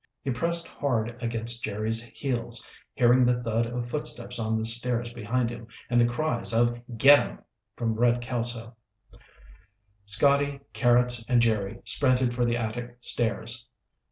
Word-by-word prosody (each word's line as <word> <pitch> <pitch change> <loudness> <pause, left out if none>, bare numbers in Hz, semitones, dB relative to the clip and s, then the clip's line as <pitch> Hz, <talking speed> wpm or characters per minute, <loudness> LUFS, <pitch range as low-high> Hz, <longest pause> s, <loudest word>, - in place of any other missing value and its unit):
He 135 - -2
pressed 170 +6 +3
hard 120 -4 -2
against 115 0 0
Jerry's 110 +2 0
heels, 120 -1 -4 0.3
hearing 125 +1 +4
the 120 0 +1
thud 115 0 -1
of 120 0 -5
footsteps 125 -3 -1
on 110 0 -1
the 110 - -2
stairs 120 +1 +1
behind 120 +1 -2
him 115 -1 -10 0.2
and 120 0 +4
the 120 - +4
cries 120 -2 -1
of 120 +1 +1 0.2
"Get 140 +4 +7
'em" - - -6 0.4
from 115 -1 -2
Red 120 +2 +2
Kelso. 120 -1 -2 1.3
Scotty, 140 +6 +3
Carrots, 120 -1 +2
and 125 -1 +3
Jerry 110 -3 0
sprinted 130 -3 +1
for 120 0 0
the 120 0 0
attic 120 +1 -5
stairs. 120 0 -1
120 Hz, 145 wpm, -26 LUFS, 115-125 Hz, 1.3 s, Get